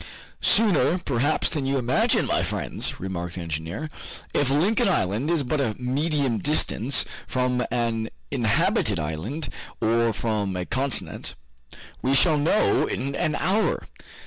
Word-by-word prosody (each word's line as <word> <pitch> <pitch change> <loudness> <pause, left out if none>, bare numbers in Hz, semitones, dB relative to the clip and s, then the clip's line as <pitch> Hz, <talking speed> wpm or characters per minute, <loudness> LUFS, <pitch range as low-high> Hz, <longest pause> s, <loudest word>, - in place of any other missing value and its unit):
"Sooner, 200 -5 +4
perhaps, 145 -3 0
than 140 -4 -2
you 135 0 +1
imagine, 125 0 +2
my - - +1
friends," - - -2
remarked 90 -2 -4
the 90 - -5
engineer, 80 - -4 0.4
"if 145 - +2
Lincoln 185 +10 +2
Island 110 - 0
is 170 -4 +2
but 145 +3 0
a 110 -6 0
medium 135 -1 0
distance 140 -4 +1 0.2
from 125 -1 0
an 115 -2 -1 0.2
inhabited 110 -5 +2
island, 90 - -3 0.3
or 115 +1 +2
from 105 -3 -1
a 90 0 -2
continent. 130 +4 -2 0.7
We 135 +2 +2
shall 155 +1 +4
know 165 +8 +3
in 140 +2 -3
an 155 +1 0
hour. 205 +4 +1
130 Hz, 135 wpm, -25 LUFS, 110-150 Hz, 0.7 s, Sooner